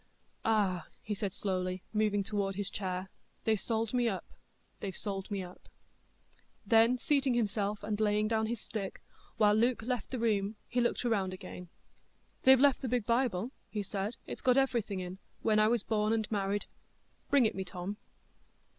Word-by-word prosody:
"Ah!" 200 -5 +1 0.2
he 210 - -2
said 200 -1 -2
slowly, 185 -1 -2
moving 210 -2 +2
toward 195 -1 -1
his 200 0 -2
chair, 185 -1 -3 0.3
"they've 220 -3 +2
sold 225 +1 -1
me 245 -2 +3
up—they've 190 -1 -8
sold 195 -2 -4
me 200 -2 -2
up." 180 0 -12 1.0
Then 230 +2 +5
seating 275 -2 +2
himself, 205 -2 0
and 210 0 -2
laying 210 0 +2
down 220 0 +1
his 235 0 -2
stick, 200 -3 -5 0.3
while 210 -2 +5
Luke 230 +2 +2
left 245 -2 -2
the 260 - -3
room, 215 -3 +1
he 245 0 +1
looked 240 - +1
round 200 -6 +1
again. 180 -1 -8 0.8
"They've 265 0 +9
left 280 -1 +5
the 260 - -2
big 245 -3 +1
Bible," 235 -2 +1 0.2
he 210 -2 -2
said. 200 +3 -3
"It's - - -6
got 255 0 +4
everything 235 -8 +1
in,—when 190 +4 -1
I 215 - +5
was 230 -2 +2
born 215 0 +1
and 220 -2 0
married; 200 -1 0 0.6
bring 280 -4 +5
it 220 - +2
me, 190 - -3
Tom." 185 +2 -5
210 Hz, 165 wpm, -32 LUFS, 195-230 Hz, 1.0 s, They've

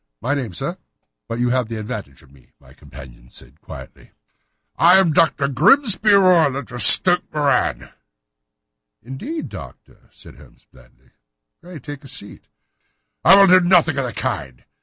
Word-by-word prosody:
"My 125 +6 -3
name, 130 -7 -5
sir; - - -6 0.5
but 115 - -6
you 120 0 -1
have 125 -3 -2
the 115 - -6
advantage 105 -9 -9
of 65 - -24
me," 65 -3 -23
said - - -38
my - - -21
companion 60 -2 -16 0.3
quietly. - - -14 0.6
"I 175 +3 +4
am 180 -5 +1
Dr. 145 -3 0
Grimesby 210 - +2
Roylott, 165 -10 +1
of 120 0 -7
Stoke 180 - +5
Moran." 145 -4 -2 1.1
"Indeed, 230 - -8
Doctor," - - -14
said - - -18
Holmes - - -21
blandly. - - -25 0.5
"Pray 175 -1 -13
take 145 +1 -11
a - - -13
seat." 100 -5 -8 0.8
"I 195 - +6
will 200 - +6
do 185 0 +5
nothing 175 -4 +1
of 135 - -3
the 125 - -6
kind. 65 -10 -6
140 Hz, 155 wpm, -18 LUFS, 115-180 Hz, 1.1 s, I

